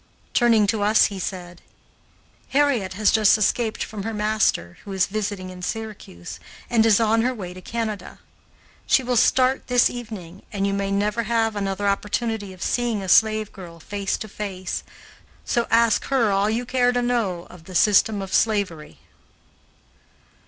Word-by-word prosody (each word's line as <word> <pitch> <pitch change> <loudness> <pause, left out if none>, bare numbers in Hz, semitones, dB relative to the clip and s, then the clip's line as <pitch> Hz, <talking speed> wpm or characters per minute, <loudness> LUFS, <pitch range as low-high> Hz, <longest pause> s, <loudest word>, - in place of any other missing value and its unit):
Turning 230 -3 +4
to 205 +1 0
us 210 +2 +5
he 195 - -6
said: 175 -2 -6 0.9
"Harriet 270 -9 +1
has 210 +2 +2
just 215 -2 +5
escaped 220 +1 0
from 210 -2 -7
her 225 +2 -4
master, 210 - 0
who 200 - -9
is 190 -2 +2
visiting 200 -3 -4
in 180 0 -10
Syracuse, 180 - -6 0.3
and 230 -2 +4
is 215 -1 +5
on 225 0 +3
her 250 +2 0
way 180 -5 -7
to 185 - -11
Canada. 215 -3 -5 0.7
She 265 - +4
will 250 0 -1
start 255 +3 +3
this 245 -1 +3
evening 205 -7 -8
and 200 -1 -1
you 200 - 0
may 200 0 -1
never 205 +3 0
have 225 -2 +1
another 200 0 -2
opportunity 205 +1 -1
of 185 -1 -8
seeing 235 -5 -1
a - - -6
slave 215 +2 +3
girl 170 -3 -11
face 200 +4 -3
to 215 - -7
face, 195 -3 -5 0.6
so 235 -1 0
ask 230 -1 +3
her 245 -6 +2
all 195 +1 +2
you 235 +3 -1
care 245 0 +2
to 245 0 0
know 215 -8 -1
of 175 -3 -15
the 185 - -10
system 205 +1 +3
of 190 - -8
slavery." 190 - 0
210 Hz, 165 wpm, -23 LUFS, 190-230 Hz, 0.9 s, us